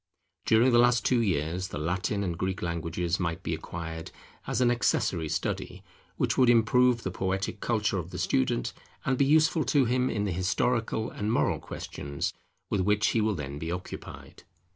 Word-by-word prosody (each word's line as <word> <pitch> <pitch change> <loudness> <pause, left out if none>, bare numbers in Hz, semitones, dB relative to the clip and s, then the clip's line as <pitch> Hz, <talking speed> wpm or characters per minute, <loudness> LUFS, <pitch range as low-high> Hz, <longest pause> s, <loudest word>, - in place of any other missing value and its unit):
During 115 +3 +5
the 120 - +5
last 120 -2 +4
two 125 -2 +3
years 90 -2 -1
the - - -6
Latin 90 +6 -1
and 90 -3 -2
Greek 95 +2 -3
languages 85 0 -2
might 85 -2 -2
be - - -2
acquired, 80 -1 -6 0.4
as - - -1
an 125 -1 +4
accessory 105 -9 +1
study, 80 - -3 0.3
which - - 0
would 125 -2 +6
improve 120 +1 +4
the 95 - -2
poetic 95 +3 -2
culture 105 -4 0
of 85 0 -6
the - - -7
student, 65 -2 0 0.3
and 135 - +2
be 140 - +3
useful 155 +2 +4
to 140 -3 +3
him 125 +2 +1
in 105 -2 -1
the 100 - -1
historical 110 +5 0
and 105 +1 -2
moral - - +1
questions 70 0 -5 0.3
with 100 - 0
which 105 +3 +2
he 115 - +1
will 105 -1 +1
then 70 -2 -5
be 80 +2 -4
occupied. 90 +1 -8
100 Hz, 180 wpm, -28 LUFS, 85-120 Hz, 0.4 s, would